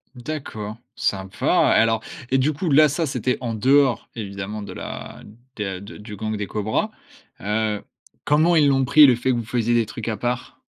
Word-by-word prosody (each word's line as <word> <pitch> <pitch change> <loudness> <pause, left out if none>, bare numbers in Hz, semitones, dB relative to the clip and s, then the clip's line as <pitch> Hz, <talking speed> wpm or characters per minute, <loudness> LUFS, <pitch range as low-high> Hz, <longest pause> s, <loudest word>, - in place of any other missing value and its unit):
D'accord, 120 -6 -6 0.2
sympa! 95 -1 +1
Et - - +6
alors, 115 -1 +1 0.3
et 135 - +4
du 135 +4 +2
coup, 160 +4 -3
là, 155 +1 +6
ça, 160 +4 -1
c'était 130 -3 -1
en 120 -3 -3
dehors, 130 +3 +3
évidemment 100 0 -5
de 100 - -7
la - - -8 0.3
de 95 -3 -4
de 100 +4 -11
du 105 -1 -9
gang 110 +1 -3
des 105 -1 -4
cobras. 110 - -1 0.5
Heu, 105 0 -1 0.4
comment 160 +4 +4
ils 150 -2 +5
l'ont 135 -1 +3
pris 150 +3 +7
le 130 -4 +5
fait 130 +2 0
que 120 - 0
vous 115 - -4
faisiez 120 0 0
des 115 -1 +3
trucs 115 +1 -6
à 110 - -2
part? 125 +3 -4
115 Hz, 195 wpm, -22 LUFS, 105-135 Hz, 0.5 s, pris